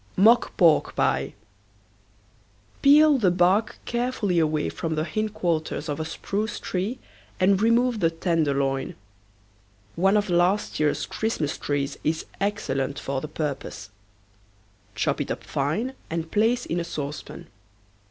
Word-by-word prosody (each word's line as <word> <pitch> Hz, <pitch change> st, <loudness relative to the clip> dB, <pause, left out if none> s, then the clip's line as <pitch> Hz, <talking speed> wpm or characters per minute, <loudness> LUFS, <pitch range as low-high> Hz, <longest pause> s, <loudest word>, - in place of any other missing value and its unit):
MOCK 225 Hz, +5 st, +4 dB
PORK 165 Hz, -5 st, +4 dB
PIE. 70 Hz, +1 st, 0 dB, 1.5 s
Peel 295 Hz, 0 st, +6 dB
the 195 Hz, -5 st, +4 dB
bark 180 Hz, +5 st, +2 dB
carefully 235 Hz, -7 st, 0 dB
away 155 Hz, -1 st, +1 dB
from 160 Hz, -1 st, -3 dB
the 155 Hz, -, 0 dB
hindquarters 170 Hz, -4 st, -2 dB
of 145 Hz, 0 st, -3 dB
a 160 Hz, -, -2 dB
spruce 205 Hz, +7 st, -3 dB
tree 195 Hz, +7 st, -3 dB, 0.4 s
and 190 Hz, +1 st, +3 dB
remove 230 Hz, +1 st, +3 dB
the 165 Hz, -, +3 dB
tenderloin. 140 Hz, -5 st, 0 dB, 1.0 s
One 195 Hz, +4 st, +3 dB
of 210 Hz, 0 st, 0 dB
last 180 Hz, +4 st, +1 dB
year's 150 Hz, -1 st, +1 dB
Christmas 190 Hz, -10 st, -2 dB
trees 140 Hz, -1 st, -2 dB
is 160 Hz, +1 st, -1 dB
excellent 140 Hz, -9 st, -1 dB
for 135 Hz, -1 st, -3 dB
the 155 Hz, -, -5 dB
purpose. 140 Hz, -9 st, -5 dB, 1.0 s
Chop 110 Hz, -, 0 dB
it -, -, -4 dB
up -, -, -4 dB
fine 180 Hz, -, -2 dB, 0.2 s
and 165 Hz, 0 st, -4 dB
place 225 Hz, +3 st, +2 dB
in 175 Hz, -, -2 dB
a -, -, -1 dB
saucepan. 150 Hz, -3 st, -6 dB
170 Hz, 130 wpm, -25 LUFS, 150-210 Hz, 1.5 s, Peel